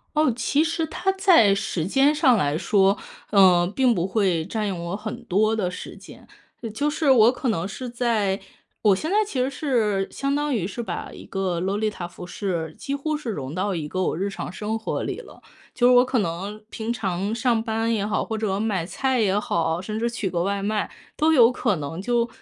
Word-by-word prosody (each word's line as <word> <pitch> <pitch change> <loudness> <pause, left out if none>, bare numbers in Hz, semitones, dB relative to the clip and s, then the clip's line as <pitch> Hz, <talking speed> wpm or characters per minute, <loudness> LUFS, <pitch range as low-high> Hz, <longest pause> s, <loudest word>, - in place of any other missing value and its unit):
哦， 305 -2 +4
其 285 +5 +1
实 330 0 -1
它 385 +5 -1
在 345 - +5
时 195 -5 -2
间 275 +8 +3
上 275 -5 +4
来 145 -6 +1
说， 195 +2 +3 0.3
呃， 185 -4 +6
并 245 +6 +2
不 175 -2 0
会 190 -5 +1
占 215 +4 -2
用 185 -4 -3
我 175 +3 -3
很 215 +1 -6
多 215 +4 +2
的 195 -5 -1
时 180 - -8
间。 - - -14 0.5
就 290 +4 0
是 300 -1 +1
我 235 -3 +7
可 260 - -3
能 190 -2 -1
是 250 +6 -6
在 230 -5 0 0.4
我 205 -3 +5
现 310 - -4
在 405 - +2
其 280 -11 -3
实 255 - +2
是， 225 -9 0
相 275 +1 -2
当 295 0 0
于 210 -9 0
是 205 +5 -5
把 - - -5
一 - - -11
个 185 -3 -2
洛 190 +3 -1
丽 215 +1 0
塔 180 -4 -6
服 175 +1 -10
饰， 170 -4 -3
几 275 - -4
乎 305 +2 -2
是 295 -6 -5
融 140 -7 -5
到 190 +2 -1
一 160 -3 -3
个 185 +5 -2
我 180 - 0
日 195 - -1
常 195 - -6
生 210 +4 -3
活 225 - -3
里 - - -4
了。 - - -14 0.3
就 245 - +3
是 250 - +6
我 245 0 +7
可 255 -1 0
能 200 +3 -3
平 225 +1 -3
常 195 -3 -2
上 235 -1 +1
班 225 0 -1
也 205 -2 -1
好， 210 +1 0
或 220 - -3
者 210 -3 -1
买 205 -5 -1
菜 260 +7 0
也 200 -2 +2
好， 165 -4 -1
甚 215 +3 -4
至 235 +1 0
取 235 -4 -2
个 175 -1 -1
外 200 +2 -1
卖， 210 +1 -1 0.3
都 315 +1 +3
有 245 -5 +6
可 210 -5 0
能 165 +4 -5
就 235 +1 +1
215 Hz, 240 characters per minute, -24 LUFS, 190-245 Hz, 0.5 s, 我